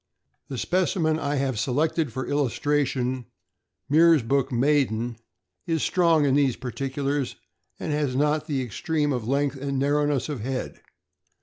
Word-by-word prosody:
The 135 - -5
specimen 170 -1 +1
I 145 -1 -1
have 135 -5 -1
selected 150 +4 0
for 130 +3 -4
illustration, 130 -3 0 0.6
Meersbrook 140 -4 +4
Maiden 120 -3 +1 0.5
(13744), 165 - +1
is 160 - -1
strong 165 -4 +3
in 135 - +2
these 135 -4 +3
particulars, 135 +1 -3 0.4
and - - -3
has 145 -4 0
not 150 +2 +1
the 140 -4 -1
extreme 145 +5 -1
of 120 -3 -3
length 140 +1 0
and 140 -1 -2
narrowness 145 -1 +1
of 150 -5 -4
head. 130 +4 -4
140 Hz, 135 wpm, -25 LUFS, 130-150 Hz, 0.6 s, Meersbrook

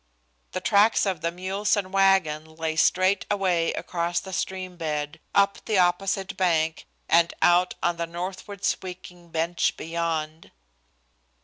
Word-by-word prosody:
The - - -3
tracks 210 +3 +4
of 185 -5 -2
the 170 - -1
mules 190 +4 -1
and 190 -2 -3
wagon 160 -6 +2
lay 160 0 -2
straight 185 +4 +3
away 185 -5 +1
across 170 0 -2
the 190 - -9
stream 185 -1 -3
bed 150 -2 -3 0.2
up 200 0 +3
the 215 - +1
opposite 190 +2 +1
bank 160 -3 0 0.2
and 170 0 +4
out 180 +1 +4
on 175 0 +1
the 170 0 -2
northward 185 +4 -6
sweeping 180 -2 -4
bench 165 +2 0
beyond. 160 -1 -3
175 Hz, 135 wpm, -25 LUFS, 165-190 Hz, 0.2 s, tracks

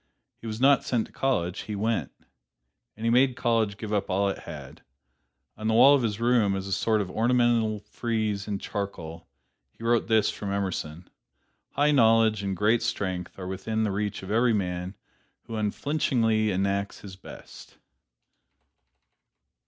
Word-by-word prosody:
He 115 - -9
was 110 0 -5
not 135 +2 +5
sent 120 -3 0
to - - -19
college: 95 -9 -1
he 105 - -5
went. 110 +2 -1 0.9
And 110 - -5
he 115 - +3
made 130 +1 +4
college 115 -5 0
give 110 -1 -5
up 100 -1 -1
all 100 +2 +1
it 100 - -4
had. - - -10 0.7
On 110 +1 -5
the 110 - +2
wall 135 +5 +8
of 140 - +3
his 110 -2 -2
room, 115 -4 +2
as 95 0 -4
a 100 - -6
sort 105 +2 +1
of 95 -2 -5
ornamental 115 -2 +2
frieze 105 -2 -3
in 105 -1 -2
charcoal, 85 -5 -6 0.5
he - - -12
wrote 115 0 +2
this 110 -2 +3
from 100 -1 -5
Emerson: 90 -4 -3 0.7
"High 145 +1 +3
knowledge 115 -5 +4
and 95 -2 -3
great 110 +3 +3
strength 95 -6 -3
are 95 - -6
within 105 +4 -2
the 105 - 0
reach 100 0 -3
of 95 - -6
every 115 +2 +3
man 90 -1 -2 0.5
who 115 - -7
unflinchingly 110 -1 0
enacts 100 +1 -1
his 95 -2 -10
best." 95 - -13
110 Hz, 160 wpm, -26 LUFS, 100-115 Hz, 0.9 s, wall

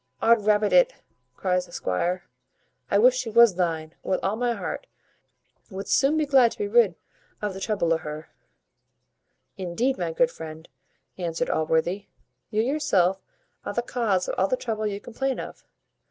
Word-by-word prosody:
"Odrabbit 215 -2 +3
it!" - - +5 0.4
cries 180 -1 0
the - - -17
squire, 175 - -1 0.7
"I 200 - +3
wish 250 +4 +6
she 250 -2 -3
was 235 -1 +6
thine, 165 -3 -2
with 185 - -1
all 195 +2 0
my 240 +1 0
heart - - -5 0.8
wouldst 195 -1 -1
soon 280 +3 +3
be 310 - +2
glad 265 -5 +5
to - - -17
be 205 - -2
rid 210 -4 +4 0.4
of 205 -2 -3
the 190 - -7
trouble 195 -5 0
o' - - +2
her." 155 0 -8 1.3
"Indeed, 190 +8 -1
my 170 -2 -1
good 245 +9 +2
friend," 160 -2 -9 0.5
answered 170 -2 -2
Allworthy, 160 +5 0 0.4
"you 215 0 +1
yourself 205 - +1 0.4
are - - -4
the 240 - 0
cause 210 -7 0
of - - -2
all 190 - +3
the 255 - 0
trouble 215 -3 -2
you 200 -1 -3
complain 265 +4 -3
of. - - -8
205 Hz, 165 wpm, -25 LUFS, 175-240 Hz, 1.3 s, wish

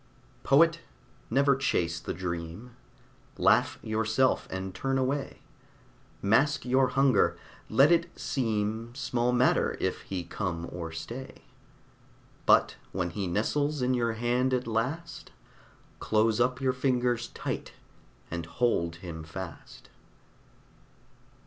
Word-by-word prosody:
Poet, 165 +4 +4 0.5
never 140 +3 +4
chase 85 -10 0
the - - -5
dream. 85 +6 -5 0.6
Laugh - - +3
yourself, 110 +4 +1
and 95 0 -4
turn 135 0 -1
away. 135 +2 -2 0.8
Mask 135 +10 +3
your 130 +1 +3
hunger; 130 -3 +3 0.3
let 135 +8 +5
it 170 0 +3
seem 115 -2 -2
Small 125 -3 0
matter 125 +1 +2
if - - -1
he 95 -2 -4
come 85 -1 -4
or 85 -2 -5
stay; 120 +11 -8 1.0
But - - +5
when 90 -2 -2
he 100 +1 -3
nestles 145 +9 0
in 125 +1 +2
your 115 -2 +1
hand 125 +3 +1
at 125 - -2
last, 130 +10 -3 0.7
Close 110 +1 +2
up 125 +1 +2
your 130 -1 +1
fingers 125 -2 0
tight - - -4 0.6
and 85 -1 -4
hold 85 -4 0
him 80 -2 -6
fast. 85 +2 -9
120 Hz, 115 wpm, -29 LUFS, 95-130 Hz, 1.0 s, let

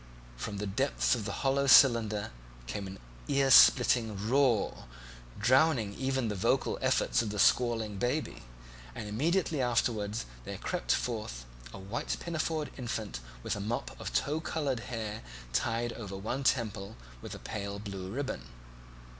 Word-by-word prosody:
From 100 - -5
the 105 - -3
hollow 95 -1 -6
depths 135 +3 +2
of 115 -5 -2
the 135 +6 0
cylinder 115 -5 +5 0.3
came 100 - -5
an 95 +1 -8 0.3
earsplitting 125 -4 +6 0.2
roar, 130 -6 +2 0.5
drowning 130 -2 +3
even 130 0 -1
the 105 - -1
vocal 115 +7 0
efforts 130 -2 +2
of 115 - -3
the 105 - -5
squalling 115 -2 +2
baby, 130 +7 -2 0.5
and 105 - -6
immediately 155 - 0
afterwards 115 -3 0 0.2
there - - -6
crept - - -2
forth 105 - -2 0.3
a - - -9
white 100 +5 -3
pinafored 160 -2 -2
infant 110 - -4 0.2
with - - -1
a - - -5
mop 110 +4 -3
of - - -4
tow 140 - 0
coloured 145 -6 -2
hair 110 -3 -4 0.3
tied 115 - 0
over 100 -4 -7
one 120 +7 -3
temple 110 -5 0 0.3
with - - -7
a - - -7
pale 100 0 -5
blue 100 -3 -6
ribbon. 130 - -4
115 Hz, 145 wpm, -31 LUFS, 105-130 Hz, 0.5 s, earsplitting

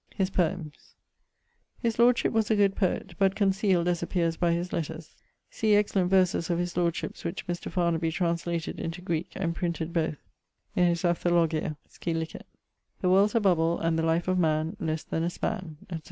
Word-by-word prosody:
<_His 190 0 +1
poems._> 170 -4 -2 0.8
His 230 -2 -2
lordship 240 +1 +4
was 220 -2 +1
a 220 - +4
good 200 -2 +3
poet, 190 -1 -1
but 195 0 +3
conceal'd, 195 -3 +2
as 175 -1 +1
appeares 170 -1 0
by 170 +1 +1
his 175 +1 -2
letters. 160 0 -4 0.4
See 215 -2 +2
excellent 200 -3 +2
verses 185 -3 +2
of 170 - +1
his 175 0 -2
lordship's 170 -1 -1
which 170 +3 -4
Mr. 175 -1 -4
Farnaby 170 -2 +1
translated 170 -1 -2
into 165 +2 -4
Greeke, 170 -2 -2
and 170 -3 -1
printed 170 -1 -3
both 160 -3 0 0.6
in 180 -1 +4
his 170 0 0
Ἀνθολογία, 170 -3 +1
scil. 165 -1 -4 0.6
The 185 - +2
world's 200 +3 +4
a - - +5
bubble, 170 -5 +2
and 165 0 0
the - - 0
life 165 +2 +1
of 185 0 +2
man 155 -1 +1
Less 160 -1 -2
then 160 - -2
a 170 - +1
span, 180 -4 -4
etc. 170 -3 -6
175 Hz, 180 wpm, -28 LUFS, 165-190 Hz, 0.8 s, a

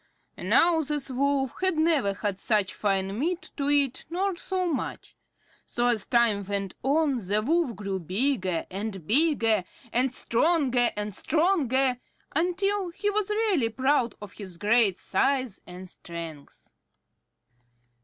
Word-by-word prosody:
Now 335 -1 +3
this 290 -2 -3
Wolf 270 0 0
had 375 -3 +2
never 310 -11 +2
had 200 -2 -3
such 210 -3 +1
fine 195 0 -1
meat 350 +5 -2
to 280 -1 -1
eat, 280 -3 +1
nor 375 +2 -1
so 370 +1 -2
much. 320 -6 -4 0.5
So 240 0 0
as 225 -5 0
time 235 -4 +3
went 195 -1 -3
on, 280 -3 +1
the 205 +2 +2
Wolf 315 -3 +1
grew 195 -1 -4
bigger 185 - -1
and 195 -3 -5
bigger, 230 - +3 0.3
and 255 +2 +3
stronger 255 -1 +2
and 210 0 -4
stronger, 270 - +1 0.4
until 370 +4 0
he 410 +4 -2
was 420 0 -1
really 420 - +1
proud 255 0 +1
of 205 - -10
his 190 -5 -7
great 210 -1 +3
size 255 +1 0
and 180 +1 -9
strength. 165 -5 -10
250 Hz, 135 wpm, -26 LUFS, 205-320 Hz, 0.5 s, Now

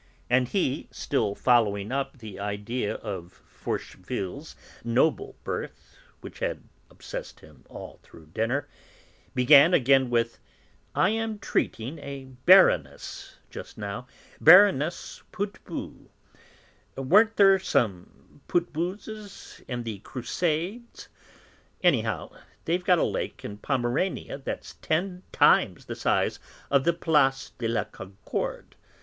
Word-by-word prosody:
And 125 0 +4
he, 145 -4 -1
still 110 -8 -1
following 105 -4 +2
up 135 0 -2
the 110 -5 -10
idea 105 +3 -3
of 95 -5 -8
Forcheville's 120 - -6 0.3
noble 120 +7 +1
birth, - - -6 0.3
which - - -10
had - - -3 0.3
obsessed - - -8
him 75 -3 -18
all - - -10
through 80 - -16
dinner, 120 +6 -1 0.7
began 145 +6 +7
again 135 0 +4
with: 115 -1 0 0.6
"I 185 - +4
am 225 0 -2
treating 140 - -2
a 140 -1 -7 0.2
Baroness 185 +1 +4 0.2
just - - -9
now, 105 +4 -5 0.3
Baroness 170 -2 +5
Putbus; 205 -1 -6 0.9
weren't 210 +12 +4
there 195 -1 +6
some 110 - -2
Putbuses 185 +5 -4
in 120 -2 -4
the 110 -4 -5
Crusades? 175 - -3 0.7
Anyhow - - +1 0.3
they've 175 +2 0
got 180 0 +4
a - - +2
lake - - -3
in 105 0 -7
Pomerania 135 - -1
that's 135 - -6
ten 180 +3 -1
times - - +3
the - - -5
size - - 0 0.3
of 140 -1 +3
the 170 - +4
Place 135 -5 +1
de 115 - -1
la 115 -3 0
Concorde. 95 -1 -6
135 Hz, 115 wpm, -26 LUFS, 115-175 Hz, 0.9 s, began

